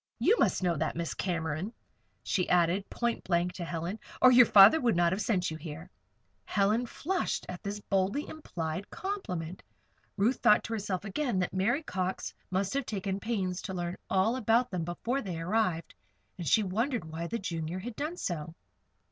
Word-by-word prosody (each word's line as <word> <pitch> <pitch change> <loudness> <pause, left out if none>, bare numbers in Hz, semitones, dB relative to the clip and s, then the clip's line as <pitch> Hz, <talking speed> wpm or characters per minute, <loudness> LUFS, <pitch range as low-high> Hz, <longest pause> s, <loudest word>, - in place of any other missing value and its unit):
You 450 - +4
must - - +2
know 175 -2 +2
that, 155 +2 -1
Miss 170 0 -2
Cameron," 170 +1 -2 0.5
she 180 - 0
added, 180 +3 +2
point 235 -1 -1
blank 175 0 +1
to 180 - -5
Helen, 170 +5 -4 0.2
"or 255 - +8
your 245 -2 +8
father 205 +10 +8
would 235 -5 +2
not 170 0 +3
have 190 +3 -1
sent 185 -5 0
you 160 - -5
here." 160 +1 -8 0.5
Helen 215 +5 +1
flushed 365 +9 -2
at 180 - -7
this 205 0 -4
boldly 195 +9 0
implied 180 - -5
compliment. 185 - -4 0.6
Ruth 225 +6 +2
thought 210 - +5
to 230 - -4
herself 200 -3 -3
again 240 +1 -1
that 180 -1 -1
Mary 235 +11 +1
Cox 185 -6 -3 0.2
must 190 +3 -1
have 275 -2 -1
taken 195 -2 -2
pains 195 -5 -2
to 190 - -5
learn 175 0 -3
all 195 +5 +2
about 240 0 +2
them 180 -3 -2
before 235 +10 -2
they 180 -7 -5
arrived, 180 -1 0 0.4
and 175 -3 -6
she 215 +10 +4
wondered 225 - -1
why 160 +2 -5
the 230 - -2
Junior 165 -3 -4
had 220 +5 -6
done 310 +7 -3
so. 165 - -4
190 Hz, 180 wpm, -30 LUFS, 175-230 Hz, 0.6 s, or